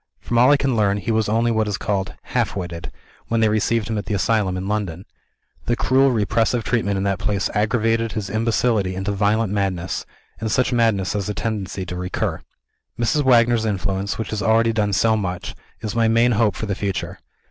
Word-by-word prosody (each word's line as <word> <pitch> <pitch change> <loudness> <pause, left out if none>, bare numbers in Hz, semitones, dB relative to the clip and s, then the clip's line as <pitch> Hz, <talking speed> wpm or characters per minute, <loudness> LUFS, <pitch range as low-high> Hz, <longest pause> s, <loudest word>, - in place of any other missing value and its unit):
From 120 - 0
all 125 +3 +6
I 145 - +6
can 135 -2 0
learn, 100 -2 +2
he 100 +3 -2
was 110 -1 +1
only 115 +2 +2
what 110 -1 +1
is 100 -3 -1
called 95 -2 -2
"half - - -1
witted," 85 -3 -5 0.4
when 115 - 0
they 110 -1 +4
received 110 +1 +1
him 110 -2 -1
at 100 - -7
the 105 - -1
asylum 100 -2 +1
in 95 +1 -4
London. 100 -4 -3 0.6
The 120 - +2
cruel 135 +3 +3
repressive 115 +1 +1
treatment 100 -5 0
in 95 - -1
that 100 -2 0
place 100 -3 -1
aggravated 115 +1 +1
his 105 -3 -3
imbecility 110 -2 0
into 95 +2 -2
violent 105 +1 +1
madness 95 -4 -2 0.3
and 110 -1 -2
such 125 0 +1
madness 110 -6 +2
has 105 -1 -2
a 105 - -3
tendency 95 -1 -3
to 90 - -6
recur. 90 0 -3 0.6
Mrs. 120 +6 +2
Wagner's 120 -3 +4
influence, 100 -1 -2
which 110 - -4
has 110 -1 -2
already 115 +1 +3
done 105 -2 0
so 110 +3 +3
much, 90 -4 -3 0.3
is 110 0 -4
my 115 -1 +3
main 115 +2 +3
hope 110 -2 +2
for - - -4
the 100 - -2
future. 100 0 -3
105 Hz, 200 wpm, -21 LUFS, 100-115 Hz, 0.6 s, all